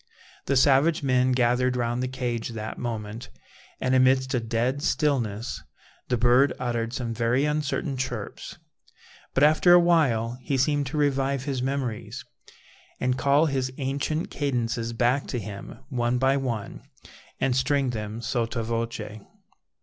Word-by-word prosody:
The 140 Hz, -, +2 dB
savage 145 Hz, +4 st, +4 dB
men 130 Hz, -1 st, +3 dB
gathered 125 Hz, 0 st, +2 dB
round 120 Hz, 0 st, -1 dB
the 130 Hz, -, -1 dB
cage 125 Hz, -3 st, -3 dB
that 110 Hz, -1 st, -6 dB
moment, 110 Hz, -1 st, -5 dB, 0.5 s
and 130 Hz, -, 0 dB
amidst 130 Hz, +1 st, +3 dB
a 125 Hz, -, +2 dB
dead 120 Hz, +4 st, -1 dB
stillness 130 Hz, -7 st, -1 dB, 0.5 s
the 125 Hz, -, +1 dB
bird 125 Hz, +4 st, +4 dB
uttered 120 Hz, -2 st, -2 dB
some 120 Hz, -2 st, -3 dB
very 120 Hz, +4 st, +1 dB
uncertain 150 Hz, 0 st, -1 dB
chirps, 125 Hz, -5 st, -5 dB, 0.8 s
but 135 Hz, -, +3 dB
after 155 Hz, +4 st, +6 dB
awhile 135 Hz, -10 st, +3 dB
he 135 Hz, +1 st, -1 dB
seemed 145 Hz, +1 st, +1 dB
to 150 Hz, +4 st, -4 dB
revive 140 Hz, -2 st, +1 dB
his 135 Hz, -3 st, -2 dB
memories, 130 Hz, -4 st, -3 dB, 0.7 s
and 125 Hz, 0 st, +1 dB
call 140 Hz, +4 st, +3 dB
his 130 Hz, -4 st, -1 dB
ancient 140 Hz, +4 st, -2 dB
cadences 120 Hz, -4 st, -1 dB
back 120 Hz, +4 st, +1 dB
to 125 Hz, -, -3 dB
him 100 Hz, -2 st, -7 dB
one 120 Hz, -2 st, 0 dB
by 135 Hz, +2 st, +3 dB
one, 120 Hz, -6 st, -3 dB, 0.6 s
and 130 Hz, -2 st, +1 dB
string 130 Hz, 0 st, +1 dB
them 110 Hz, 0 st, -5 dB
sotto 115 Hz, 0 st, -1 dB
voce. 115 Hz, -1 st, -4 dB
125 Hz, 140 wpm, -26 LUFS, 115-140 Hz, 0.8 s, after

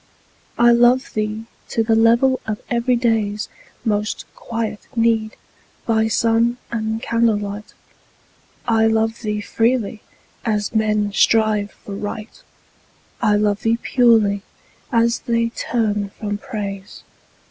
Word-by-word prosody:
I 240 Hz, 0 st, +6 dB
love 245 Hz, +2 st, +4 dB
thee 215 Hz, +1 st, -2 dB, 0.2 s
to 225 Hz, -, +1 dB
the 225 Hz, 0 st, +1 dB
level 235 Hz, +4 st, +4 dB
of 215 Hz, -1 st, -2 dB
everyday's 235 Hz, -4 st, +1 dB, 0.4 s
Most 210 Hz, -1 st, -1 dB
quiet 225 Hz, -2 st, -4 dB
need, 225 Hz, -1 st, +1 dB, 0.5 s
by 220 Hz, -1 st, +2 dB
sun 230 Hz, +2 st, +2 dB
and 220 Hz, -1 st, -2 dB
candle 230 Hz, -2 st, +2 dB
light. 205 Hz, +1 st, -6 dB, 0.9 s
I 225 Hz, -1 st, +3 dB
love 225 Hz, 0 st, 0 dB
thee 210 Hz, -2 st, -2 dB
freely, 225 Hz, 0 st, 0 dB, 0.4 s
as 210 Hz, -2 st, -1 dB
men 215 Hz, -2 st, +1 dB
strive 215 Hz, -1 st, +2 dB
for 200 Hz, -, -6 dB
Right; 210 Hz, +2 st, -6 dB, 0.8 s
I 210 Hz, -, +3 dB
love 205 Hz, -1 st, +1 dB
thee 230 Hz, +1 st, +2 dB
purely, 225 Hz, -6 st, +3 dB, 0.5 s
as 235 Hz, -1 st, +2 dB
they 230 Hz, -1 st, +1 dB
turn 210 Hz, -4 st, -1 dB
from 205 Hz, -1 st, -3 dB
Praise. 200 Hz, -4 st, -6 dB
220 Hz, 115 wpm, -20 LUFS, 210-230 Hz, 0.9 s, I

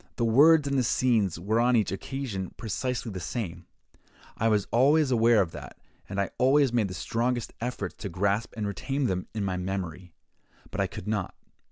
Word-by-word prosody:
The 120 Hz, -, 0 dB
words 145 Hz, +6 st, +6 dB
and 140 Hz, -1 st, +1 dB
the -, -, +2 dB
scenes 110 Hz, -8 st, +1 dB
were 105 Hz, +6 st, 0 dB
on 125 Hz, +1 st, +3 dB
each 110 Hz, -5 st, +2 dB
occasion 100 Hz, -3 st, -5 dB
precisely 120 Hz, +2 st, -3 dB
the 95 Hz, -, -5 dB
same: 90 Hz, -1 st, -5 dB, 0.7 s
I 115 Hz, -, 0 dB
was 105 Hz, -3 st, +2 dB
always 140 Hz, +4 st, +4 dB
aware 115 Hz, -3 st, +5 dB
of 85 Hz, -, -8 dB
that, -, -, -10 dB, 0.3 s
and 100 Hz, 0 st, -3 dB
I 100 Hz, -, -1 dB
always 135 Hz, 0 st, +4 dB
made 115 Hz, -4 st, +2 dB
the 90 Hz, -, -7 dB
strongest 120 Hz, +5 st, -1 dB
efforts 115 Hz, -6 st, -4 dB
to 100 Hz, -, -5 dB
grasp 100 Hz, +5 st, 0 dB
and 105 Hz, -, -2 dB
retain 135 Hz, +7 st, -2 dB
them 90 Hz, -4 st, -1 dB
in 105 Hz, -2 st, -1 dB
my 95 Hz, -1 st, -1 dB
memory, 90 Hz, -2 st, -5 dB, 0.6 s
but -, -, -2 dB
I -, -, +1 dB
could -, -, -9 dB
not. 105 Hz, -4 st, -2 dB
110 Hz, 190 wpm, -27 LUFS, 95-125 Hz, 0.7 s, words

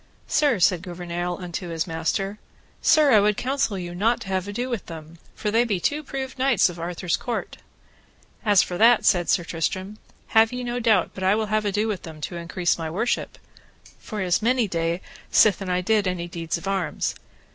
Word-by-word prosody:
Sir, 285 Hz, -6 st, +2 dB
said 180 Hz, -1 st, +3 dB
Gouvernail 175 Hz, -1 st, -4 dB
unto 175 Hz, -1 st, -5 dB
his 165 Hz, -1 st, -2 dB
master, 185 Hz, +5 st, -2 dB, 0.4 s
Sir, 300 Hz, -3 st, +5 dB
I 215 Hz, -, +7 dB
would 210 Hz, 0 st, +2 dB
counsel 260 Hz, -6 st, -1 dB
you 175 Hz, -1 st, -5 dB
not 225 Hz, +7 st, +1 dB
to 200 Hz, -, -7 dB
have 190 Hz, 0 st, -1 dB
ado 240 Hz, +5 st, -3 dB
with 240 Hz, -6 st, -4 dB
them, 160 Hz, 0 st, -10 dB, 0.2 s
for 210 Hz, -, -2 dB
they 230 Hz, +2 st, +4 dB
be 210 Hz, -6 st, -1 dB
two 295 Hz, -, -1 dB
proved 265 Hz, -2 st, -6 dB
knights 260 Hz, -7 st, +4 dB
of 175 Hz, -1 st, -9 dB
Arthur's 175 Hz, +1 st, -2 dB
court. 240 Hz, -2 st, -4 dB, 0.9 s
As 205 Hz, -4 st, +5 dB
for 175 Hz, -, -5 dB
that, 230 Hz, +1 st, +5 dB
said 175 Hz, -2 st, +3 dB
Sir 175 Hz, -, +3 dB
Tristram, 185 Hz, +5 st, -3 dB, 0.3 s
have 225 Hz, +1 st, +5 dB
ye 250 Hz, 0 st, -4 dB
no 240 Hz, 0 st, -2 dB
doubt 220 Hz, -6 st, +3 dB
but 190 Hz, -, -7 dB
I 190 Hz, +2 st, +4 dB
will 215 Hz, -1 st, -2 dB
have 215 Hz, 0 st, +1 dB
ado 205 Hz, +2 st, 0 dB
with 205 Hz, -4 st, -3 dB
them 160 Hz, -3 st, -10 dB
to 175 Hz, -, -5 dB
increase 170 Hz, +1 st, -1 dB
my 160 Hz, -1 st, -3 dB
worship, 205 Hz, +9 st, -2 dB, 0.6 s
for 210 Hz, -4 st, -5 dB
it -, -, -2 dB
is 180 Hz, +3 st, +2 dB
many 240 Hz, 0 st, +2 dB
day 170 Hz, 0 st, -1 dB, 0.3 s
sithen 195 Hz, -3 st, +4 dB
I 180 Hz, 0 st, +1 dB
did 210 Hz, +1 st, +2 dB
any 175 Hz, -1 st, -2 dB
deeds 170 Hz, -1 st, -3 dB
of 170 Hz, -, -8 dB
arms. 190 Hz, -5 st, -1 dB
195 Hz, 200 wpm, -24 LUFS, 175-225 Hz, 0.9 s, I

